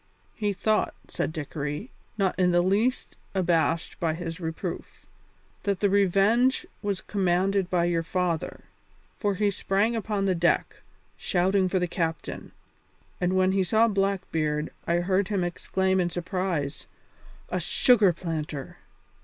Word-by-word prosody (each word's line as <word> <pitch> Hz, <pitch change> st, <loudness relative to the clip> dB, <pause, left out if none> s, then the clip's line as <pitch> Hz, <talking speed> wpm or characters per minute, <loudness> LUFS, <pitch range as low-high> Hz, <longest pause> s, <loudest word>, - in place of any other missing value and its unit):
"He 210 Hz, -2 st, -1 dB
thought," 215 Hz, +2 st, 0 dB
said -, -, -2 dB
Dickory, 150 Hz, -, -4 dB, 0.3 s
not 195 Hz, -3 st, +2 dB
in 180 Hz, -1 st, +4 dB
the 175 Hz, 0 st, +3 dB
least 210 Hz, +7 st, 0 dB, 0.2 s
abashed 170 Hz, -2 st, +1 dB
by 160 Hz, -2 st, 0 dB
his 165 Hz, -1 st, -5 dB
reproof, 160 Hz, -2 st, -5 dB, 0.6 s
"that 200 Hz, -2 st, -1 dB
the 200 Hz, -2 st, +2 dB
Revenge 200 Hz, +6 st, +3 dB, 0.2 s
was 200 Hz, -2 st, -2 dB
commanded 190 Hz, 0 st, +1 dB
by 175 Hz, -2 st, +2 dB
your 170 Hz, -1 st, +1 dB
father, 175 Hz, -1 st, -2 dB, 0.6 s
for 205 Hz, -2 st, 0 dB
he 205 Hz, +1 st, +2 dB
sprang 200 Hz, +4 st, +1 dB
upon 210 Hz, -3 st, -1 dB
the 190 Hz, -, +2 dB
deck, 175 Hz, 0 st, +1 dB, 0.4 s
shouting 190 Hz, +1 st, +1 dB
for 185 Hz, -, +1 dB
the 180 Hz, -, +1 dB
captain, 165 Hz, -2 st, -3 dB, 0.7 s
and 180 Hz, 0 st, +1 dB
when 185 Hz, 0 st, +3 dB
he 195 Hz, 0 st, +2 dB
saw 220 Hz, +5 st, +3 dB
Blackbeard 180 Hz, -7 st, -1 dB, 0.2 s
I 170 Hz, +1 st, +2 dB
heard 190 Hz, +1 st, +1 dB
him 200 Hz, -3 st, 0 dB
exclaim 190 Hz, +2 st, 0 dB
in 175 Hz, -1 st, +1 dB
surprise, 175 Hz, -5 st, -3 dB, 0.6 s
'A -, -, 0 dB
sugar 215 Hz, -7 st, +4 dB
planter!'" 155 Hz, -5 st, -5 dB
185 Hz, 135 wpm, -27 LUFS, 170-200 Hz, 0.7 s, in